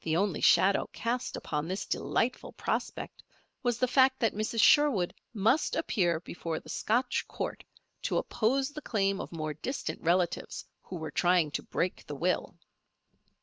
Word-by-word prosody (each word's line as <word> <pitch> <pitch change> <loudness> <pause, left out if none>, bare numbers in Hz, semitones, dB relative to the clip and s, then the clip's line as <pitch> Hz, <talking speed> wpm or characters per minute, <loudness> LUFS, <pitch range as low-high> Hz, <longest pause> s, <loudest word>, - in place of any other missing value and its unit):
The 160 0 +1
only 195 +1 0
shadow 195 +1 +4
cast 240 +2 -2
upon 150 0 -3
this 190 +3 -3
delightful 250 +2 -1
prospect - - -3 0.4
was 240 -2 0
the 255 - +2
fact 260 +1 +4
that 225 - +2
Mrs. 215 +2 -2
Sherwood 250 - +5 0.2
must 225 +7 +2
appear 175 - +1
before 165 -1 -5
the - - -15
Scotch 245 +3 0
Court - - -5 0.4
to - - 0
oppose 265 +5 +1
the 300 0 -7
claim 195 -6 0
of - - -8
more 155 -2 -3
distant 255 - -4
relatives 175 +1 0 0.2
who 185 - -8
were 160 -2 -5
trying 175 -4 +3
to - - -2
break 180 - -3
the 145 - -5
will. 180 +6 -1
195 Hz, 155 wpm, -30 LUFS, 170-245 Hz, 0.4 s, Sherwood